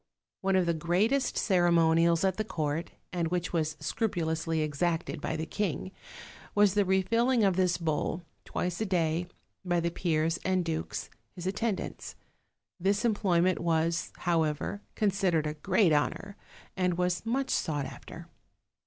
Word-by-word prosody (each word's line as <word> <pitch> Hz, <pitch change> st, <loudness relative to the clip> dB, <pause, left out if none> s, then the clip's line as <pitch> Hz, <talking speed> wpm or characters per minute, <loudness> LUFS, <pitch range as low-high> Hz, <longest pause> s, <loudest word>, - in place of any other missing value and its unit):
One 195 Hz, 0 st, +1 dB
of 185 Hz, -1 st, +3 dB
the 170 Hz, -, +2 dB
greatest 195 Hz, -, +1 dB
ceremonials 170 Hz, -2 st, +3 dB
at 190 Hz, -1 st, +1 dB
the 215 Hz, -, 0 dB
court, 155 Hz, -5 st, -2 dB, 0.2 s
and 170 Hz, -2 st, 0 dB
which 175 Hz, +1 st, -2 dB
was 160 Hz, -2 st, 0 dB
scrupulously 160 Hz, -3 st, -1 dB
exacted 160 Hz, +1 st, -1 dB
by 160 Hz, -, -2 dB
the 160 Hz, 0 st, -3 dB
king, 190 Hz, 0 st, -2 dB, 0.6 s
was 205 Hz, -2 st, +5 dB
the 205 Hz, -1 st, +3 dB
refilling 230 Hz, +6 st, +2 dB
of 195 Hz, -3 st, +3 dB
this 180 Hz, -1 st, +2 dB
bowl, 165 Hz, +1 st, -1 dB, 0.2 s
twice 180 Hz, +2 st, -3 dB
a -, -, +1 dB
day, 170 Hz, -2 st, 0 dB, 0.4 s
by 175 Hz, -2 st, +1 dB
the 170 Hz, 0 st, -1 dB
peers 165 Hz, -1 st, 0 dB
and 185 Hz, -2 st, +1 dB
dukes, 160 Hz, -1 st, -3 dB, 0.2 s
his 175 Hz, -, -7 dB
at 190 Hz, +1 st, -2 dB
tendants. 220 Hz, -4 st, -3 dB, 0.6 s
This 200 Hz, +5 st, +1 dB
employment 185 Hz, -5 st, +2 dB
was, 165 Hz, 0 st, 0 dB
however, 165 Hz, +3 st, 0 dB
considered 195 Hz, -6 st, +1 dB
a 150 Hz, -, -1 dB
great 175 Hz, +2 st, +2 dB
honor, 195 Hz, +7 st, -1 dB, 0.4 s
and 180 Hz, -2 st, 0 dB
was 180 Hz, 0 st, 0 dB
much 260 Hz, +4 st, -1 dB
sought 145 Hz, -3 st, 0 dB
after. -, -, -9 dB
175 Hz, 145 wpm, -29 LUFS, 165-195 Hz, 0.6 s, was